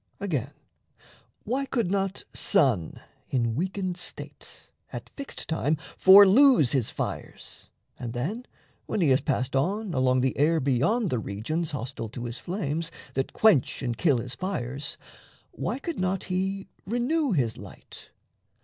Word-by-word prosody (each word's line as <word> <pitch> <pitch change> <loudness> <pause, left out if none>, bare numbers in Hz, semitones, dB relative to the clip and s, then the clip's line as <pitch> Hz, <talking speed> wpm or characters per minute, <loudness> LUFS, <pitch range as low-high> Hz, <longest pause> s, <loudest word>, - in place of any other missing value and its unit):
Again, 145 - -2 0.9
why 265 +5 -1
could 230 -10 0
not 195 -1 -1
sun, 130 - +1 0.3
in 115 -3 0
weakened 185 - -2
state, 180 - -9 0.2
At - - -7
fixed 280 -1 -6
time 160 -1 0 0.2
for 195 +2 +9
lose 230 - +6
his 130 -5 +1
fires, - - -6 0.3
and 120 -2 -5
then, 185 - -3 0.4
When - - -1
he 160 - +4
has 130 +1 +4
passed 130 -3 -1
on 190 +8 0
along 130 -1 +2
the 130 0 0
air 160 +3 +4
Beyond 150 - +1
the 125 - +1
regions, 135 +12 -3
hostile 125 -4 -5
to 120 +2 -6
his 120 +1 -5
flames, 165 -3 -3 0.2
That 135 0 -2
quench 185 - +3
and 120 -2 -1
kill 145 0 +3
his 125 +2 -4
fires, 140 -7 -4 0.5
why - - -3
could 330 +4 -5
not 185 0 0
he 190 +1 -2 0.2
Renew 250 +4 +1
his 120 -8 +1
light? 100 -2 -12
160 Hz, 145 wpm, -27 LUFS, 130-195 Hz, 0.9 s, for